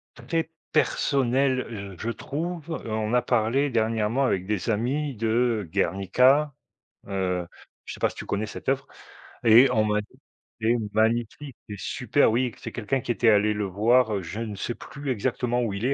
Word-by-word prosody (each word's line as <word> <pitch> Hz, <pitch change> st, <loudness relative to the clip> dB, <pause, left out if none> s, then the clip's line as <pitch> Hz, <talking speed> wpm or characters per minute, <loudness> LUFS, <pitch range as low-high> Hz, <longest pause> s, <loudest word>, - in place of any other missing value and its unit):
très 165 Hz, -1 st, -2 dB, 0.2 s
personnel, 135 Hz, -3 st, +1 dB
je 100 Hz, -4 st, -7 dB
je -, -, +1 dB
trouve. 165 Hz, +7 st, -5 dB, 0.2 s
On 110 Hz, 0 st, -2 dB
a 125 Hz, -, +4 dB
parlé 125 Hz, +4 st, +1 dB
dernièrement 115 Hz, +1 st, +1 dB
avec 95 Hz, -8 st, 0 dB
des 105 Hz, 0 st, -2 dB
amis 135 Hz, +7 st, 0 dB
de 115 Hz, -2 st, +1 dB
Guernica. 125 Hz, +10 st, +3 dB, 0.5 s
Heu, 90 Hz, -3 st, -1 dB, 0.4 s
je -, -, -6 dB
sais -, -, -12 dB
pas -, -, +3 dB
si -, -, -13 dB
tu -, -, -6 dB
connais 100 Hz, +2 st, -1 dB
cette 105 Hz, -, -9 dB
oeuvre? 135 Hz, +1 st, 0 dB, 0.6 s
Et 120 Hz, +4 st, +8 dB
on 110 Hz, -3 st, +2 dB
m'a 105 Hz, 0 st, +1 dB
dit: 105 Hz, -, -19 dB, 0.4 s
«C'est 115 Hz, +2 st, +3 dB, 0.2 s
magnifique, 120 Hz, +5 st, 0 dB
c'est 105 Hz, -2 st, -7 dB
super» -, -, +1 dB
oui, 120 Hz, +1 st, 0 dB
c'est -, -, -7 dB
quelqu'un 125 Hz, +3 st, -1 dB
qui 120 Hz, -, -2 dB
était 115 Hz, +3 st, +3 dB
allé 105 Hz, 0 st, +4 dB
le 105 Hz, 0 st, -2 dB
voir, 110 Hz, +4 st, +3 dB
heu, -, -, -3 dB
je 95 Hz, +7 st, -6 dB
ne 110 Hz, -3 st, -4 dB
sais 115 Hz, +5 st, -4 dB
plus 145 Hz, -1 st, -8 dB
exactement, 125 Hz, +1 st, -1 dB
où 115 Hz, -, -1 dB
il 100 Hz, +5 st, -3 dB
est 135 Hz, -, +2 dB
115 Hz, 180 wpm, -25 LUFS, 105-130 Hz, 0.6 s, Et